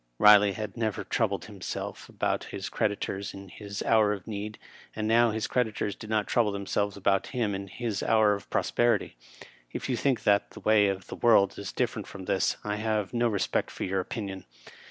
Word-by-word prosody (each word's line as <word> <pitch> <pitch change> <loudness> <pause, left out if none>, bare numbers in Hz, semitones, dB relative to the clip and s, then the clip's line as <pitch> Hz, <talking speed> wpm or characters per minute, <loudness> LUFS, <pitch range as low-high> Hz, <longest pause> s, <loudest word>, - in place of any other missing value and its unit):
Eiley 105 -2 +7
had 110 -1 -5
never 110 -3 -2
troubled - - -1
him - - -12
seK - - -5
about - - -1
his - - -6
creditors 100 -1 -2
in 95 0 -10
his 100 +1 -6
hour 110 -2 +4
of 100 -4 -7
need, 105 0 -5 0.4
and 110 0 -2
now 115 +1 +5
his 110 0 -2
creditors 110 -4 -1
did 110 - -10
not 110 -1 +1
trouble 115 -4 +2
themselves 100 0 -2
about 95 0 +1
him 110 -4 +1
in 100 0 -4
his 110 +1 -3
hour 110 -2 +4
of 100 - -6
prosperity. 120 - +1 0.6
K - - -3
you 130 - 0
think 125 -2 0
that 100 -1 +3
the - - -11
way 105 -1 +4
of 95 -2 -2
the - - -7
world 110 -5 +4
is 100 - -5
diflEerent - - -2
from 95 -2 -9
this, 95 - +1
I 105 0 -2
have 110 -2 -1
no 120 0 +2
respect 105 -4 0
for - - -6
your 95 +1 0
opinion. 95 -1 -5
105 Hz, 195 wpm, -28 LUFS, 100-110 Hz, 0.6 s, Eiley